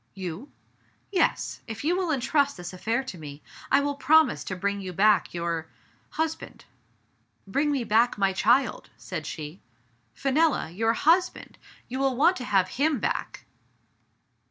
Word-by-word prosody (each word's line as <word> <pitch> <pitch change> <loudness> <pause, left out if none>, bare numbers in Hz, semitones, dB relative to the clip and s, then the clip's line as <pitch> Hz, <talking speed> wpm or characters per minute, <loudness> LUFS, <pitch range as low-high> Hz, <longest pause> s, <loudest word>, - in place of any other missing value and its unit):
"You?" 190 - -6 0.6
"Yes. 375 - 0
If 225 +1 -6
you 335 +4 +2
will 365 -2 -1
intrust 280 -1 +1
this 175 +1 -7
affair 225 +7 -1
to 190 -10 -8
me, 145 -1 -10 0.3
I 275 - +5
will 285 0 -1
promise 300 -1 +3
to 185 - -4
bring 200 +2 -2
you 185 -1 -6
back 210 +3 +3
your 170 -2 -3 0.2
— - - -36
husband." 320 0 -3 0.8
"Bring 280 +10 0
me 275 -4 0
back 230 +2 +2
my 195 -1 +2
child," 270 +7 +2
said - - -6
she. 155 +3 -7 0.5
"Fenella! 275 - +1
your 225 +5 +1
husband! 335 +9 +1 0.3
you 260 +2 -4
will 270 -1 +1
want 340 +8 +4
to 250 - -6
have 190 -4 +2
him 295 +2 +1
back - - -3
235 Hz, 155 wpm, -26 LUFS, 190-285 Hz, 0.8 s, I